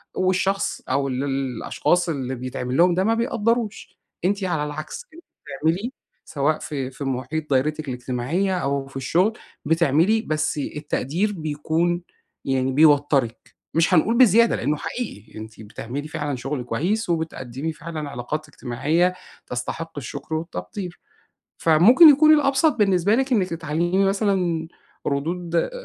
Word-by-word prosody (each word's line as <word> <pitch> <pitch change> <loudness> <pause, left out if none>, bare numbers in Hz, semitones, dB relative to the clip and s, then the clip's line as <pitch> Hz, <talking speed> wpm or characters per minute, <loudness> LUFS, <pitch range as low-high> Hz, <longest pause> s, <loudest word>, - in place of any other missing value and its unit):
والشخص 190 +1 0
أو 135 +1 +1
ال 130 +1 -2
الأشخاص 135 +6 0
اللي 130 -4 -3
بيتعمل 125 0 -4
لهم 175 +1 +5
ده 185 - +2
ما 225 +3 +2
بيقدّروش. 230 -1 -1 0.3
أنتِ 200 +1 +1
على 160 -5 0
العكس، 155 - -6
أنتِ 335 +2 -14 0.4
تعملي 180 +10 0 0.3
سواء 150 +1 0
في 135 -4 -4
في 135 - -8
مُحيط 135 +4 -3
دايرتِك 150 +3 0
الاجتماعية، 130 +10 -1
أو 140 -3 -1
في 135 - -9
الشغل 180 - +1 0.3
بتعملي 165 +7 +3
بس 155 0 -1
التقدير 150 +7 -2
بيكون 160 +3 -1 0.4
يعني 130 -1 0
بيوتّرِك. 145 -5 +2 0.2
مش 165 +3 +3
هنقول 220 +8 +3
بزيادة 235 -1 +5
لإنه 145 +5 -1
حقيقي. 115 - -6
أنتِ 110 0 -10
بتعملي 120 +7 -6
فعلًا 150 -3 -3
شغل 135 +1 -4
كويس، 175 - -1
وبتقدّمي 160 -3 -3
فعلًا 155 -3 -6
علاقات 145 +5 -5
اجتماعية 150 +9 0 0.3
تستحق 160 +6 -4
الشُكر 145 +4 -5
والتقدير. 170 - -6 0.6
فممكن 205 - +7
يكون 310 +2 +6
الأبسط 285 +1 +3
بالنسبة 195 -2 +3
لِك، 265 0 0
إنِّك 190 -5 +2
تتعلّمي 170 +4 0
مثلًا 190 -5 0 0.4
ردود 170 - -1
160 Hz, 130 wpm, -23 LUFS, 135-190 Hz, 0.6 s, فممكن